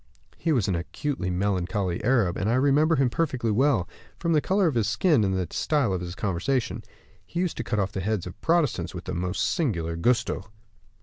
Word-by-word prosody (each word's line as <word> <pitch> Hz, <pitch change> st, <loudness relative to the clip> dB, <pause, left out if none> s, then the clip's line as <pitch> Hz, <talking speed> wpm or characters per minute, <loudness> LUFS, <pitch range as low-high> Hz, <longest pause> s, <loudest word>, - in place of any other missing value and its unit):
He 165 Hz, -, 0 dB
was 125 Hz, -10 st, +2 dB
an 95 Hz, -, +1 dB
acutely 95 Hz, -, -3 dB
melancholy 95 Hz, 0 st, -1 dB
Arab, 115 Hz, -7 st, +2 dB
and 100 Hz, +1 st, -1 dB
I 120 Hz, -, +2 dB
remember 145 Hz, +5 st, +3 dB
him 135 Hz, -4 st, +2 dB
perfectly 130 Hz, -7 st, 0 dB
well, 120 Hz, -5 st, +2 dB, 0.3 s
form 170 Hz, -1 st, 0 dB
the 150 Hz, -, +4 dB
color 195 Hz, +4 st, +2 dB
of 160 Hz, -, +2 dB
his 110 Hz, -3 st, +1 dB
skin, 150 Hz, -, +3 dB
and 95 Hz, -1 st, +1 dB
the 90 Hz, -, 0 dB
style 140 Hz, -10 st, +1 dB
of 90 Hz, -, -2 dB
his 90 Hz, 0 st, -6 dB
conversation. 105 Hz, +7 st, -1 dB, 0.4 s
He 170 Hz, -, -5 dB
used 180 Hz, -2 st, 0 dB
to -, -, -2 dB
cut 105 Hz, -1 st, -2 dB
off 100 Hz, -1 st, 0 dB
the 95 Hz, -, -3 dB
heads 105 Hz, -1 st, -1 dB
of 90 Hz, 0 st, -9 dB
Protestants 165 Hz, -5 st, +1 dB
with -, -, -6 dB
the -, -, -5 dB
most 90 Hz, +3 st, -1 dB
singular 85 Hz, -, -1 dB
gusto!" 120 Hz, +8 st, 0 dB
110 Hz, 205 wpm, -26 LUFS, 95-145 Hz, 0.4 s, the